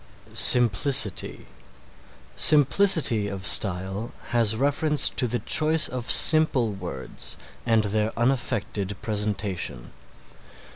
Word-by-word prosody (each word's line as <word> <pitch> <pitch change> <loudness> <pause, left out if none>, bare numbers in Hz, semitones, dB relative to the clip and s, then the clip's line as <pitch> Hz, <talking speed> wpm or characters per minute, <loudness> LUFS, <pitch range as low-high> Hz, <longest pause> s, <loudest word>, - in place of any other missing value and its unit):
SIMPLICITY 120 -1 +2 0.9
Simplicity 145 - +3
of 95 -1 -8
style 95 +4 0 0.2
has 115 -3 0
reference 145 +4 0
to 125 - -2
the 120 +1 -3
choice 155 +8 +2
of 125 -2 -8
simple 155 -8 +4
words 90 -9 -6 0.3
and 115 -2 +1
their 105 +1 -3
unaffected 115 -6 -4
presentation. 100 - -4
115 Hz, 90 wpm, -22 LUFS, 100-135 Hz, 0.9 s, simple